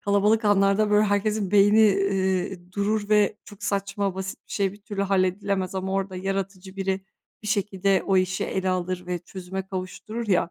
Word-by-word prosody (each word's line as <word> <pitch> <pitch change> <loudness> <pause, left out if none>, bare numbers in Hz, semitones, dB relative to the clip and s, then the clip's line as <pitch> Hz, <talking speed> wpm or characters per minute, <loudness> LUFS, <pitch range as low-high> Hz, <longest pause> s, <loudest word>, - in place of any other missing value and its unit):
kalabalık 205 +2 +2
anlarda, 205 +1 +3
böyle, 210 +1 +5
herkesin 205 -1 0
beyni, 205 +2 +6
iii, 190 -2 -1
durur 205 +1 0
ve 210 -1 +3
çok 205 - -14
saçma, 195 -1 -1
basit 190 0 -5
bir - - -10
şey 195 -2 0
bir 205 0 -16
türlü 205 -2 -3
halledilemez 190 0 0
ama 190 0 -2
orada 195 -1 -2
yaratıcı 195 0 -4
biri 190 0 -1 0.4
bir 210 - -5
şekilde 195 -2 +1
o 195 - +3
işi 185 0 +1
ele 190 0 -2
alır 180 0 -2
ve 180 -1 -2
çözüme 190 +1 -7
kavuşturur 200 +4 -5
ya, 175 -2 +2
195 Hz, 170 wpm, -25 LUFS, 185-205 Hz, 0.4 s, beyni